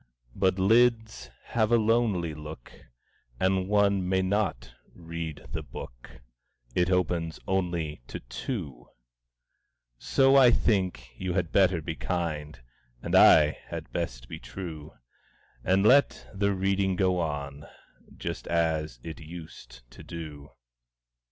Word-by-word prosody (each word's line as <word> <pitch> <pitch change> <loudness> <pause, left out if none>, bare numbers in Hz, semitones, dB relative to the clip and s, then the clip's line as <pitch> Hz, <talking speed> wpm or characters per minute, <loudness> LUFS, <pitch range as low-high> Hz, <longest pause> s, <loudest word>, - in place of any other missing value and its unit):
But 95 +4 +1
lids 110 - +2 0.2
have 110 -1 +1
a 120 - +6
lonely 110 -7 +1
look, 75 -4 -10 0.7
And 95 0 +1
one 100 -2 +2
may 95 0 +2
not 95 - -1 0.2
read 80 -3 -6
the - - -3
book - - -11 0.5
It 90 0 +1
opens 85 -3 0
only 85 -7 -1
to - - -6
two; 65 - -6 1.1
So 135 0 +3
I 130 -3 +8
think 95 - 0
you 90 -1 -2
had 85 -3 -1
better 95 -4 +3
be 80 - -3
kind, 80 -4 -3 0.4
And - - -4
I 75 -1 +7
had - - -9
best - - -4
be - - -8
true, 80 -5 -8 0.7
And 95 +5 +2
let 140 +6 +4
the 100 +1 +1
reading 95 0 +1
go 90 -1 +1
on, 75 -3 -4 0.5
Just - - -5
as 80 -6 0
it 80 -1 -7
used 80 -7 -11
to - - -13
do. 75 -4 -8
90 Hz, 125 wpm, -28 LUFS, 75-95 Hz, 1.1 s, I